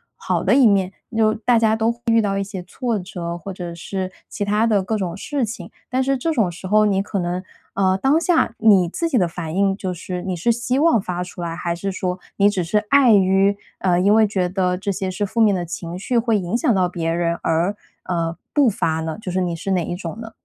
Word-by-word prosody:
好 - - -2
的 - - +4
一 270 -3 +6
面， 195 -2 +3 0.2
就 215 -1 +3
大 230 +1 +2
家 220 -1 +3
都 225 +1 +1
会 235 - -10
遇 230 0 +5
到 195 -1 -1
一 195 - 0
些 195 -2 -7
挫 235 +5 -2
折， 175 -2 -5
或 195 +4 -7
者 175 -2 -6
是 185 +2 -5 0.2
其 205 - -3
它 210 +2 +2
的 210 -4 +2
各 215 +4 -2
种 180 -4 -3
事 280 +4 -2
情， 225 +2 -7 0.2
但 255 +1 0
是 270 0 +1
这 325 +6 -1
种 220 - +1
时 180 +2 -10
候 210 +2 +4
你 195 -1 +1
可 200 - -3
能， 180 +1 -2 0.3
呃， 190 -1 +2
当 280 +4 +3
下 330 -9 +1
你 195 -6 +5
自 335 - -2
己 310 - -2
的 180 - +2
反 165 0 -6
应 195 0 +2
就 185 -3 -3
是 180 +1 -6
你 185 -1 -2
是 180 +8 +1
希 240 +3 0
望 310 -7 +4
发 180 -2 -3
出 175 -1 -8
来？ 165 -1 -3
还 170 -1 -2
是 195 +3 -3
说 185 -1 -3 0.2
你 200 0 +5
只 190 -3 -1
是 190 +6 +1
碍 275 -5 +6
于， 195 0 +4 0.2
呃， 180 -2 +1
因 205 +3 +4
为 220 - +5
觉 190 -4 -1
得 180 -1 0
这 195 +2 -3
些 190 -1 -3
是 205 - -3
负 215 +3 -2
面 215 -2 +5
的 180 -2 -1
情 170 +1 -6
绪 240 +4 -1
会 225 -3 +2
影 180 +5 -1
响 240 - +2
到 185 -3 +2
别 165 -2 -2
人 170 0 0
而， 170 +5 +1 0.3
呃， 165 -2 -1 0.2
不 285 -4 +4
发 165 -7 0
呢， 160 +5 -4
就 180 - -5
是 185 - 0
你 175 -2 -1
是 180 - -6
哪 180 -3 +1
一 - - -4
种 175 +3 -6
呢？ 225 -1 -8
195 Hz, 270 characters per minute, -21 LUFS, 180-220 Hz, 0.3 s, 一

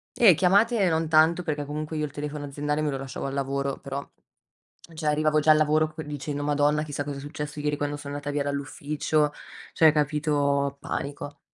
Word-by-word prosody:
Eh, 200 -9 +7
chiamate, 200 +3 +3
non 160 0 0
tanto 160 +2 +4
perché 150 -4 -3
comunque 155 +2 -4
io 150 - 0
il 145 - -8
telefono 150 0 -5
aziendale 150 +2 -2
me 150 - 0
lo 135 - -2
lasciavo 135 0 -6
al 135 - -3
lavoro, 140 0 -2
però, 140 0 -6 0.9
cioè 155 0 -6
arrivavo 155 0 +2
già 155 +1 +5
al 155 - +6
lavoro 155 +1 +2
c 160 - -6
dicendo: 145 0 -4
"Madonna, 145 +1 +2
chissà 145 -2 -4
cosa 145 -1 -5
è - - -6
successo 150 +1 -6
ieri 150 0 -1
quando 145 0 -2
sono 145 -1 -7
andata 145 0 -4
via 145 0 -1
dall'ufficio", 145 +1 -1 0.4
cioè, 160 -1 +6
capito, 145 -2 +1
panico. 145 +1 -5
150 Hz, 195 wpm, -26 LUFS, 145-155 Hz, 0.9 s, Eh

